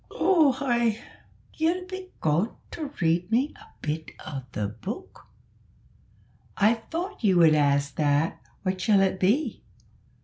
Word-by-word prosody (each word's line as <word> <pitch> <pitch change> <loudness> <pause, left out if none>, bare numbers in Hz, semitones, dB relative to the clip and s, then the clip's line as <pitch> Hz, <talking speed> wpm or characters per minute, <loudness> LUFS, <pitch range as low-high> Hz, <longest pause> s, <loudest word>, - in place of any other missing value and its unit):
"Oo 325 -7 +5
ay, 235 -4 +1 0.5
ye'll 340 +3 0
be 375 0 -7
gawin' 160 +8 +2 0.2
to 300 -4 -5
read 175 +3 +1
me 260 +6 +2
a - - -16 0.2
bit 155 +1 -3 0.2
o' 145 -4 -5
the 105 -3 -2
book?" 200 - -8 1.3
"I 210 +3 +5
thought 335 - -5
you 190 -4 +4
would 165 -2 +7
ask 140 -1 +2
that; 145 +1 +1 0.2
what 185 -1 -1
shall 205 -1 +4
it 190 -1 +1
be?" 230 +7 +1
200 Hz, 135 wpm, -26 LUFS, -, 1.3 s, would